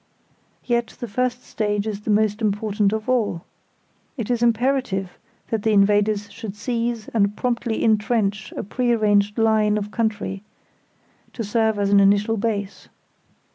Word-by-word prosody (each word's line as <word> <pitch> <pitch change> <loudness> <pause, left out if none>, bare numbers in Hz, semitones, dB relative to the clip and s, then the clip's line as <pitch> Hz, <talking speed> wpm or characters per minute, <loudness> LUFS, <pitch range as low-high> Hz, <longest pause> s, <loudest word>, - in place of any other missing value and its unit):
Yet 235 -1 -1
the 240 - -4
first 250 +3 -1
stage 210 -1 -2
is 210 -2 -4
the 215 - -6
most 210 +1 +2
important 210 -1 +1
of 220 0 -3
all. 220 -9 0 0.7
It 235 -1 -3
is 240 -1 0
imperative 235 -5 0 0.3
that 225 -2 0
the 220 +1 +1
invaders 205 0 +2
should 220 -4 -7
seize 230 0 -2
and 205 -2 +1
promptly 235 -2 -1
intrench 215 -2 +1
a - - -4
pre 240 +4 0
arranged 210 -1 +2
line 215 -2 +3
of 210 0 -4
country, 215 -4 -2 0.9
to 230 - -4
serve 220 0 +1
as 200 -1 0
an 200 - +6
initial 205 +3 +3
base. 205 -2 -3
215 Hz, 145 wpm, -22 LUFS, 205-230 Hz, 0.9 s, an